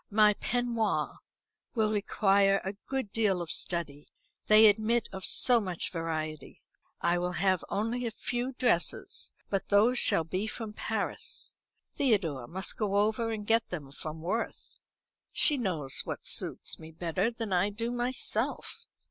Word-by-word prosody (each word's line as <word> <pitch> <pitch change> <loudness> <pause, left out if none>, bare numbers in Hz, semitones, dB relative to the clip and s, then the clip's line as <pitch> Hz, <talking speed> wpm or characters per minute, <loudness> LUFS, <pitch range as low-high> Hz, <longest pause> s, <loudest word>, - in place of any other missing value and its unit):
My 210 0 +5
peignoirs 235 -1 -1 0.6
will 215 -2 +1
require 195 -1 +2
a 190 - -3
good 265 -7 -3
deal 210 -5 +1
of 170 -2 -5
study; 150 -5 -1 0.4
they 215 +1 +7
admit 220 +2 +3
of 190 0 -7
so 245 -2 +6
much 185 -4 -3
variety. 155 -2 -5 0.4
I 175 +1 +2
will 180 0 -2
have 185 +1 +1
only 235 +4 -2
a - - -1
few 245 +3 -3
dresses, 240 -9 0 0.2
but 195 -1 -2
those 225 +5 +4
shall 165 - +4
be 185 +6 -3
from 220 -1 -6
Paris. 480 - -3 0.4
Theodore 170 - 0
must 190 +6 -2
go 205 -3 0
over 220 +3 +1
and 210 -2 -4
get 225 +2 +1
them 145 -6 -6
from 155 +2 -7
Worth. 215 +8 -4 0.5
She 300 - +5
knows 170 - -1
what - - -6
suits - - 0
me 160 - -10
better 175 +5 -1
than 230 -4 -5
I 180 +3 +2
do 230 +3 -3
myself. 245 +1 -1
205 Hz, 150 wpm, -29 LUFS, 175-230 Hz, 0.6 s, they